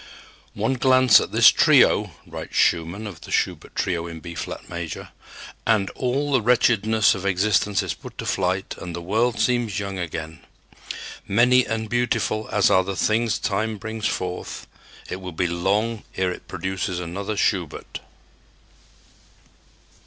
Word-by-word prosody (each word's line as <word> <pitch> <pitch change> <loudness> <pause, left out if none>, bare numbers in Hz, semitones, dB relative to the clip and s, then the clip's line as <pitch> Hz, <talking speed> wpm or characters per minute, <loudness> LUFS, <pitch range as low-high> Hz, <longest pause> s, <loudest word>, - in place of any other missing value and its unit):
"One 110 +6 0
glance 130 -3 +6
at - - -5
this - - +8
trio," - - +4 0.2
writes - - -8
Schumann 85 +5 +1
of 90 -6 -8
the - - -11
Schubert - - -1
trio 85 -1 -1
in 85 -1 -8
B 85 +1 -8
flat - - -6
major, 85 -3 -6 0.5
"and 110 -4 +1
all 135 +3 -1
the 130 -3 +3
wretchedness 110 -2 +3
of 95 - -6
existence 100 +1 +1
is - - -2
put - - -12
to - - -5
flight 95 +1 -1
and 85 -1 -6
the 85 - -5
world 110 +6 0
seems 115 -2 +1
young 100 -2 -4
again.... 80 -2 -5 0.9
Many 125 +5 +4
and 110 0 -2
beautiful 115 -2 -1
as 100 - +3
are 95 - +5
the 95 +1 -4
things 110 +3 +1
Time 110 +2 -1
brings 110 +1 -3
forth, 90 -1 -4 0.4
it - - -4
will 90 -2 -7
be 90 +3 0
long 100 +6 0
ere 95 -1 +1
it - - -9
produces 95 0 -3
another 95 +5 -4
Schubert." 90 -9 -1
100 Hz, 150 wpm, -23 LUFS, 90-110 Hz, 0.9 s, this